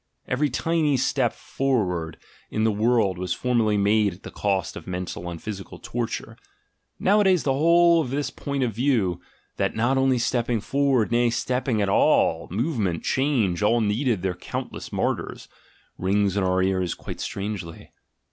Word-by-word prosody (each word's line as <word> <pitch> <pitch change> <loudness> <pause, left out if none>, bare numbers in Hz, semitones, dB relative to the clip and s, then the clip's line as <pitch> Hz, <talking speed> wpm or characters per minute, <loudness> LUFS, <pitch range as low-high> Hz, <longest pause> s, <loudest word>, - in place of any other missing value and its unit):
Every 145 +4 +1
tiny 150 +1 +1
step 125 -2 +1
forward 90 - -2 0.3
in 110 - -1
the 110 - +3
world 105 -3 +1
was 90 -1 -2
formerly 115 -4 +1
made 100 0 +2
at 95 - -21
the - - -8
cost 95 -3 -1
of - - -9
mental 90 -1 -4
and 85 -1 -6
physical 100 -2 -7
torture. 120 -1 -4 0.6
Nowadays 190 -3 +3
the 135 - +1
whole 170 +3 +5
of 135 - -4
this 140 +2 -2
point 140 -1 -3
of 120 -3 -1
view 110 -8 +1 0.2
— - - -41
"that - - 0
not 120 +5 +2
only 130 -1 +3
stepping 120 -1 0
forward, 135 -1 +1
nay, 120 0 +3
stepping 120 -1 0
at - - 0
all, 80 -3 +3
movement, 105 - -1
change, 125 -11 +1
all 115 +3 +3
needed 110 -1 0
their 95 -1 0
countless - - -6
martyrs," - - -2 0.5
rings 100 +1 +1
in 100 - +1
our 95 0 +2
ears 95 -2 0
quite - - -8
strangely. 100 -5 -5
115 Hz, 160 wpm, -24 LUFS, 95-135 Hz, 0.6 s, whole